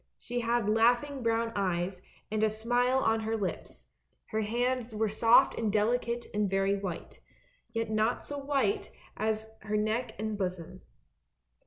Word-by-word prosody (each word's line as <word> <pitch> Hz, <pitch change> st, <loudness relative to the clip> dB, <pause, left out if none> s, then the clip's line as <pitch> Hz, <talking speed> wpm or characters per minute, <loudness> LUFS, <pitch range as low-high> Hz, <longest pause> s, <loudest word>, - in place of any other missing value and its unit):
She 245 Hz, 0 st, -4 dB
had 235 Hz, -2 st, +1 dB
laugh 230 Hz, +4 st, +4 dB
ing 285 Hz, -2 st, -6 dB
brown 230 Hz, 0 st, +1 dB
eyes, 185 Hz, -1 st, -1 dB, 0.3 s
and 215 Hz, 0 st, 0 dB
a 220 Hz, -, +4 dB
smile 245 Hz, +4 st, +1 dB
on 225 Hz, -2 st, +2 dB
her 220 Hz, +1 st, -1 dB
lips; 195 Hz, -4 st, -5 dB, 0.4 s
her 220 Hz, -, 0 dB
hands 240 Hz, +1 st, -1 dB
were 220 Hz, +1 st, +1 dB
soft 225 Hz, +3 st, +5 dB
and 220 Hz, -2 st, -1 dB
delicate 235 Hz, +3 st, +1 dB
and 210 Hz, -1 st, +1 dB
very 195 Hz, +1 st, +2 dB
white, 190 Hz, -4 st, -6 dB, 0.5 s
yet 225 Hz, -1 st, -2 dB
not 215 Hz, +2 st, +1 dB
so 285 Hz, 0 st, -5 dB
white 290 Hz, +9 st, 0 dB, 0.3 s
as 220 Hz, 0 st, -1 dB
her 210 Hz, 0 st, -2 dB
neck 220 Hz, +2 st, -1 dB
and 215 Hz, 0 st, -3 dB
bosom. 180 Hz, -3 st, -4 dB
220 Hz, 155 wpm, -30 LUFS, 210-240 Hz, 0.5 s, soft